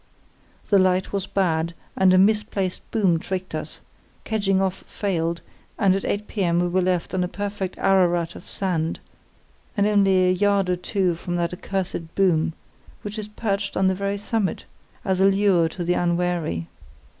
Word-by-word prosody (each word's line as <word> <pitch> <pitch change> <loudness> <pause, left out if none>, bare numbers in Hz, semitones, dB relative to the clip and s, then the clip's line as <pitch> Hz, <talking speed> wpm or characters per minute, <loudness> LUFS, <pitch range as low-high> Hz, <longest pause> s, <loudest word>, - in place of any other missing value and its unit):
The 200 - +6
light 185 0 +2
was 195 -1 -2
bad, 170 -4 0 0.2
and 190 -1 +4
a 185 - +5
misplaced 200 -2 +1
boom 190 -7 +2
tricked 185 +2 -5
us; - - -5 0.4
kedging 200 -3 +1
off 190 -1 -1
failed, 170 -4 -2 0.4
and 195 -3 +3
at 195 - -2
8 205 +1 -2
p.m. 175 -5 0
we 175 - +2
were 185 +2 +1
left 180 -1 0
on 185 -1 +1
a - - -1
perfect 200 0 -4
Ararat 175 -3 +2
of - - -12
sand, 170 -4 -1 0.8
and 200 - +3
only 195 -3 +4
a - - +4
yard 200 0 +2
or - - +2
two 180 0 0
from 175 +1 -4
that 170 0 -1
accursed 180 -3 -4
boom, 170 -5 +2 0.5
which 210 +1 -5
is 210 - -5
perched 205 -2 -2
on 190 - +3
the 190 - +3
very 200 +1 -2
summit, 205 -2 -2 0.4
as 190 -1 +1
a 190 - +5
lure 195 -4 +3
to 175 +2 -5
the 175 +1 +1
unwary. 175 - 0
185 Hz, 170 wpm, -23 LUFS, 175-200 Hz, 0.8 s, The